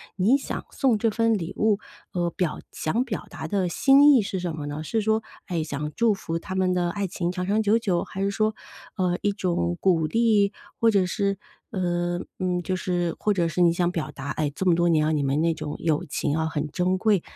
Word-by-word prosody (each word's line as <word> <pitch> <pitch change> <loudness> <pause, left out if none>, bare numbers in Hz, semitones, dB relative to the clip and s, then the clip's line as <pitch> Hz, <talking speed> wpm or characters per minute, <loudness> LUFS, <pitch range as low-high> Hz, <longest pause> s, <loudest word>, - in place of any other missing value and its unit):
你 210 +9 +4
想 - - -5
送 255 -6 +2
这 225 +2 +1
份 230 +1 +2
礼 190 -2 -3
物， 215 -1 +2 0.3
呃， 175 -1 0
表 170 -2 -2
想 225 +11 -1
表 215 -8 -5
达 160 - -6
的 190 -3 +1
心 275 +10 +6
意 245 - +5
是 195 -2 -3
什 175 -3 -3
么 150 -2 -5
呢？ 150 +2 -4
是 225 +5 0
说， 220 +1 +1 0.3
哎， 170 -4 -1
想 150 0 -4
祝 230 -2 +3
福 165 -4 -4
他 185 - -6
们 185 -1 +2
的 175 -1 +1
爱 200 0 -2
情 175 0 -2
长 180 0 -3
长 210 +3 +2
久 215 +2 +3
久， 185 -6 0
还 190 - -6
是 200 0 +1
说， 215 +1 0 0.4
呃， 180 -2 0
一 205 - +2
种 170 - -1
鼓 165 -5 +3
励？ 215 -2 +3 0.3
或 230 - +5
者 195 -4 +3
是， 200 +1 -1 0.3
呃， 175 -2 -1 0.2
嗯， 180 -1 0
就 185 - -1
是 175 -2 -1
或 210 - +2
者 175 -3 +1
是 180 - -1
你 170 -1 +5
想 175 0 +1
表 165 -4 -3
达， 140 0 -7
哎， 150 -2 -1
这 190 - -3
么 175 - +5
多 175 +1 +2
年 155 -2 +3
哦， - - +1
你 150 -2 +1
们 140 +3 +1
那 165 0 +2
种 155 -2 -5
友 155 -2 0
情 145 +1 -1
哦， 160 - 0
很 150 -1 -2
珍 185 +1 +1
贵。 200 -2 +2
180 Hz, 250 characters per minute, -25 LUFS, 165-205 Hz, 0.4 s, 心